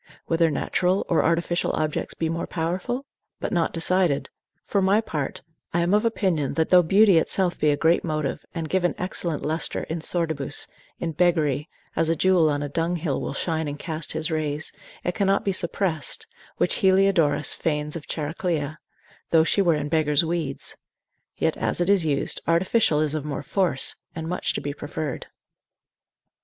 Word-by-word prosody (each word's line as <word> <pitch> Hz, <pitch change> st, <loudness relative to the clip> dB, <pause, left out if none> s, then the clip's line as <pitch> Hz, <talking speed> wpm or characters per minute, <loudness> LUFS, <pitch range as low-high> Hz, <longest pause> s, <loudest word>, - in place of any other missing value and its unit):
Whether 165 Hz, 0 st, +2 dB
natural 180 Hz, +4 st, 0 dB
or 165 Hz, -, +3 dB
artificial 170 Hz, +1 st, +1 dB
objects 155 Hz, -1 st, -2 dB
be 165 Hz, -, -1 dB
more 165 Hz, +1 st, -2 dB
powerful? 185 Hz, +11 st, -2 dB, 0.3 s
but -, -, -3 dB
not 170 Hz, -2 st, +1 dB
decided: 170 Hz, -3 st, +1 dB, 0.3 s
for 200 Hz, -, 0 dB
my 195 Hz, +3 st, +4 dB
part 150 Hz, -10 st, -4 dB, 0.3 s
I 170 Hz, -, +3 dB
am 175 Hz, +3 st, +1 dB
of 210 Hz, +2 st, +3 dB
opinion, 185 Hz, -, 0 dB
that 160 Hz, -1 st, +1 dB
though 180 Hz, -1 st, +7 dB
beauty 195 Hz, +1 st, +5 dB
itself 180 Hz, +2 st, 0 dB
be 150 Hz, -, +3 dB
a 145 Hz, -, +2 dB
great 165 Hz, +3 st, +3 dB
motive, 155 Hz, -4 st, -2 dB
and 165 Hz, -2 st, -3 dB
give 185 Hz, +2 st, 0 dB
an 175 Hz, -, +1 dB
excellent 175 Hz, -3 st, -2 dB
lustre 160 Hz, +2 st, -1 dB
in 165 Hz, 0 st, -4 dB
sordibus, 160 Hz, -5 st, -1 dB, 0.3 s
in 170 Hz, -, -3 dB
beggary, 160 Hz, -3 st, +1 dB, 0.3 s
as 165 Hz, -1 st, +1 dB
a 165 Hz, -, +2 dB
jewel 180 Hz, -2 st, +4 dB
on 145 Hz, 0 st, -1 dB
a -, -, -2 dB
dunghill 165 Hz, 0 st, -1 dB
will -, -, -4 dB
shine 160 Hz, 0 st, -1 dB
and 145 Hz, 0 st, -4 dB
cast 160 Hz, 0 st, -4 dB
his 160 Hz, +2 st, -2 dB
rays, 155 Hz, -1 st, -1 dB, 0.3 s
it 180 Hz, -, -1 dB
cannot 195 Hz, 0 st, +1 dB
be 200 Hz, -, +2 dB
suppressed, 180 Hz, -, -1 dB, 0.3 s
which -, -, +1 dB
Heliodorus 185 Hz, -7 st, +3 dB
feigns 150 Hz, -1 st, -2 dB
of 160 Hz, -, -7 dB
Chariclia, 155 Hz, -1 st, -2 dB, 0.5 s
though 160 Hz, -1 st, +5 dB
she 200 Hz, -, +2 dB
were 170 Hz, -4 st, +3 dB
in 150 Hz, -1 st, -2 dB
beggar's 155 Hz, 0 st, +2 dB
weeds: 160 Hz, -5 st, -3 dB, 0.6 s
yet -, -, +1 dB
as -, -, -1 dB
it 175 Hz, +3 st, +3 dB
is 195 Hz, -4 st, +3 dB
used, 145 Hz, -3 st, 0 dB
artificial 170 Hz, -1 st, +3 dB
is 155 Hz, -1 st, 0 dB
of 155 Hz, -2 st, -2 dB
more 145 Hz, -1 st, -4 dB
force, 165 Hz, -3 st, +1 dB, 0.2 s
and 160 Hz, -1 st, -4 dB
much 180 Hz, +2 st, -1 dB
to -, -, -3 dB
be 145 Hz, -, -3 dB
preferred. 145 Hz, -1 st, -5 dB
165 Hz, 175 wpm, -24 LUFS, 150-180 Hz, 0.6 s, though